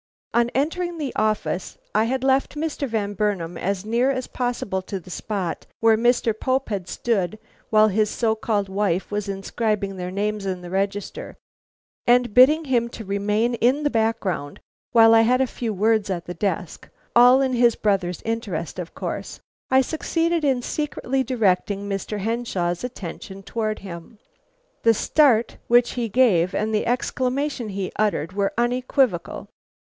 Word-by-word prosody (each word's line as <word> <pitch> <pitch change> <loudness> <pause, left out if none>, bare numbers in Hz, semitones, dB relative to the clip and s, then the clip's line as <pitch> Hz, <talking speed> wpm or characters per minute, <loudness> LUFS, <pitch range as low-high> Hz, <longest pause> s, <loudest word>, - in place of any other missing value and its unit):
On 235 0 +3
entering 340 +5 -1
the 290 -5 -4
office 215 -4 -1 0.2
I 215 +1 +3
had 260 +2 -1
left 270 +2 +2
Mr. 295 -2 -2
Van 210 -3 -2
Burnam 190 -4 -1
as 195 +3 -2
near 235 +4 +2
as 255 -2 -1
possible 240 -6 -2
to 190 +1 -5
the 180 +1 -13
spot 185 +1 -4
where 225 -1 +5
Mr. 240 0 +2
Pope 260 +4 -1
had 195 -4 -3
stood 215 -3 -1 0.3
while 215 0 +5
his 210 +1 +1
so 225 -1 +1
called 220 -3 -1
wife 190 -2 -1
was 205 -1 -2
inscribing 200 0 -2
their 180 0 -4
names 205 +2 -2
in 185 -1 -3
the 175 0 -9
register, 195 +1 -3 0.7
and 245 -2 +4
bidding 300 +7 +6
him 240 -3 +1
to 225 -2 -9
remain 210 +4 0
in 250 +5 +2
the 290 - +1
background 215 - -1 0.3
while 225 -2 +7
I 225 - +7
had 250 +3 +3
a 265 - +3
few 235 -2 -4
words 215 +1 +1
at 175 -3 -3
the 175 - -5
desk, 190 -3 -3 0.3
all 245 +2 +7
in 260 -1 0
his 240 -1 +4
brother's 190 -4 -1
interests 225 0 -3
of - - -7
course, - - -5 0.3
I 260 0 +5
succeeded 330 +3 -1
in 265 -4 +1
secretly 270 -3 -2
directing 205 -4 0
Mr. 200 +1 -3
Henshaw's 195 -5 -2
attention 195 -4 -7
towards 215 +1 -3
him. 170 +2 -9 0.6
The 230 0 +4
start 245 -3 +3
which 240 0 +4
he 235 -2 -3
gave 195 -7 +3
and 215 +1 -1
the 210 - 0
exclamation 255 +1 -1
he 195 -2 -4
uttered 200 -5 0
were 200 0 0
unequivocal. 245 - 0
220 Hz, 160 wpm, -23 LUFS, 195-250 Hz, 0.7 s, while